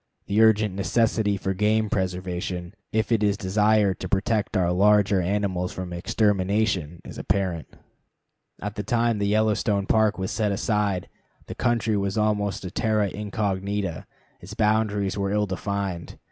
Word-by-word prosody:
The 100 +2 +2
urgent 110 -2 +4
necessity 105 +1 +1
for 95 0 -2
game 105 +3 +2
preservation, 90 -2 -3 0.2
if 110 +2 0
it 115 -2 +3
is 100 -1 +2
desired 105 0 +2
to 95 - -5
protect 105 +2 0
our 90 -2 +2
larger 100 +1 +4
animals 95 -1 -1
from 90 -1 -6
extermination, 95 -3 0
is - - -8
apparent. 95 -5 -1 1.0
At 105 -1 -3
the - - -1
time 115 +1 +1
the 100 - 0
Yellowstone 105 -1 +1
Park 110 +1 +2
was 95 0 -3
set 105 -2 0
aside, 100 -2 0 0.4
the - - -7
country 115 -3 0
was 100 +1 -1
almost 105 -2 0
a 90 - -5
terra 110 -1 +1
incognita; 100 -3 -3 0.3
its 95 +4 -10
boundaries 105 -2 +1
were 100 0 0
ill 105 0 +1
defined. 95 -2 -4
100 Hz, 145 wpm, -25 LUFS, 95-105 Hz, 1.0 s, urgent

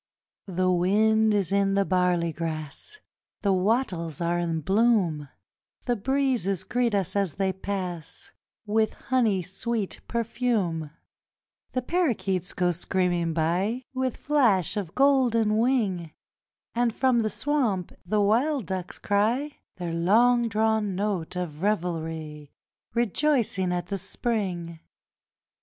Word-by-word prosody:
The 185 0 +1
wind 215 +5 +3
is 200 -4 0
in 200 0 +2
the 200 0 +2
barley 180 -3 +1
grass, 155 - -5 0.5
The 200 -2 +3
wattles 185 - 0
are 170 0 0
in 165 -2 -1
bloom; 190 - +2 0.6
The 245 - +1
breezes 245 -5 0
greet 245 -3 0
us 195 -2 -1
as 195 -6 0
they 190 -1 0
pass 185 -4 -5 0.3
With 220 +1 +1
honey 225 -8 +1
sweet 205 +3 -3
perfume; 225 -9 -1 0.8
The 255 - -1
parakeets 230 - 0
go 180 -1 +2
screaming 175 -1 0
by 185 +10 0
With 260 -1 -1
flash 230 - +2
of 195 -6 -4
golden 240 -6 +3
wing, 215 -9 +1 0.6
And 235 -1 +1
from 255 -2 +3
the 220 -1 +1
swamp 225 - 0
the 205 +4 +1
wild 240 +5 +2
ducks 185 0 -5
cry 235 +9 0 0.2
Their 175 -2 -4
long 230 +8 +3
drawn 220 -2 +1
note 190 -4 -2
of 170 -4 -4
revelry, 160 -6 -2 0.4
Rejoicing 235 -5 +1
at 175 0 -3
the 200 -1 -2
Spring. 180 -7 -2
200 Hz, 120 wpm, -26 LUFS, 175-235 Hz, 0.8 s, wind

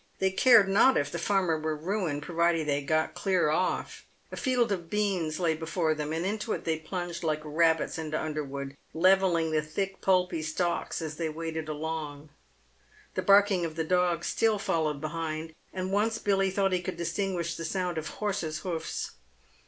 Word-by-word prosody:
They 190 0 +1
cared 220 0 +6
not 215 +7 +5
if 145 0 0
the 170 - -3
farmer 180 -3 +1
were 155 0 -2
ruined 165 -3 -2
provided 170 -1 +1
they 145 0 +1
got 155 +2 0
clear 185 -6 +1
off. 180 +4 -1 0.3
A - - -5
field 250 -4 +1
of 175 -4 -3
beans 190 -7 0
lay 170 -3 +2
before 160 0 0
them, 150 0 -4
and 165 +2 -1
into 210 +3 -2
it - - -4
they 160 -1 -1
plunged 175 +1 -5
like 155 -1 0
rabbits 160 +1 +1
into 155 -1 -2
underwood, 140 -3 -4 0.2
levelling 180 -2 +3
the 155 -1 +2
thick, 195 +6 -4
pulpy 180 -3 +2
stalks 170 +2 -2
as 155 -1 -5
they 165 -2 -1
waded 160 0 -4
along. 155 -1 -4 0.8
The - - -1
barking 200 -2 +5
of 160 -2 -3
the 160 - -1
dog 175 0 +1
still 225 -2 +2
followed 155 -7 -1
behind, 160 0 -4 0.2
and 185 0 -3
once 220 +3 +1
Billy 195 -3 +1
thought 195 0 +1
he 180 -1 +1
could 180 -1 -5
distinguish 170 -1 -2
the 165 - -5
sound 180 0 -1
of 155 - -6
horses' 170 -7 -3
hoofs. 165 -3 -3
170 Hz, 175 wpm, -29 LUFS, 155-190 Hz, 0.8 s, cared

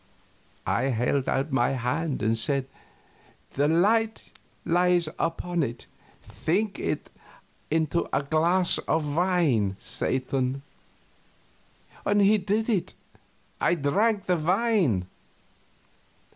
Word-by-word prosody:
I - - +1
held 130 +1 0
out 140 +3 -1
my 130 0 +2
hand 135 +3 -2
and 110 +1 +2
said, 135 +3 +1 0.9
"The 145 +2 +2
light 220 +7 +1 0.3
lies 175 0 +2
upon 175 +1 -1
it; 120 -4 -4 0.4
think 185 - -2
it - - -3 0.6
into 160 +1 0
a 140 - 0
glass 170 +5 +2
of 150 -2 0
wine, 160 - +2
Satan." 130 +1 -2 1.5
He 205 +1 +4
did 210 +4 -1
it. 210 -7 -1 0.6
I 175 - +2
drank 200 +8 +1
the 180 -1 +1
wine. 175 - +1
160 Hz, 100 wpm, -26 LUFS, 135-185 Hz, 1.5 s, He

